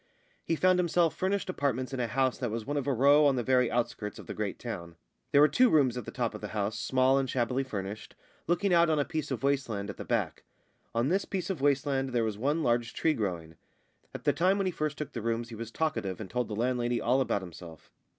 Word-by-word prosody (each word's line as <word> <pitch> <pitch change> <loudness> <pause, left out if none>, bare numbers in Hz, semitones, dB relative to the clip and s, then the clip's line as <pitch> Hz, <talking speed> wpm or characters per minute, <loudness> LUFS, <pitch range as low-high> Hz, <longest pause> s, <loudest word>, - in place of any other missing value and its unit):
He 165 - 0
found 185 +2 +3
himself 175 -1 +2
furnished 195 +1 -1
apartments 135 -7 -1
in 130 - -3
a 120 - 0
house 130 +2 0
that 125 -2 -1
was 110 0 -4
one 145 - -3
of 145 -1 -2
a - - +2
row 140 +4 +5
on 140 - +3
the 125 - -1
very 125 0 +3
outskirts 115 -3 -2
of - - -10
the - - -6
great 105 -2 -3
town. 85 -8 -7 0.4
They - - +3
were 150 +1 +8
two 250 +9 +4
rooms 135 - +3
at 125 -4 -5
the - - -6
top - - -2
of - - -8
the - - -4
house, 105 +2 -1
small 130 +4 +3
and 135 -1 -2
shabbily 125 +2 0
furnished, 105 -4 -6 0.3
looking 175 +3 +2
out 170 -1 +5
on 155 - +2
a 145 - +1
piece 155 -2 -3
of 130 -4 -4
waste 140 -2 +1
land 100 -2 -3
at - - -14
the - - -6
back. - - -1 0.5
On 120 +4 +2
this 195 +3 +1
piece 195 -1 -3
of 170 -8 -5
waste 140 -1 +2
land 135 -2 -1
there 120 -2 +2
was 110 -2 -1
one 145 +9 0
large 120 -2 0
tree 160 - +2
growing. 85 - -4 0.5
At - - -8
the - - +3
time 185 +3 +2
when 195 - 0
he 185 - +1
first 155 -2 -3
took 150 - -5
the 115 - -5
rooms 115 +1 -2
he 115 - -8
was 115 +1 -6
talkative 115 - -2
and 100 -4 -7
told 125 0 -1
the 105 - -5
landlady 120 +1 0
all 130 +3 +2
about 100 -6 0
himself. 85 -2 -11
130 Hz, 255 wpm, -29 LUFS, 115-150 Hz, 0.5 s, were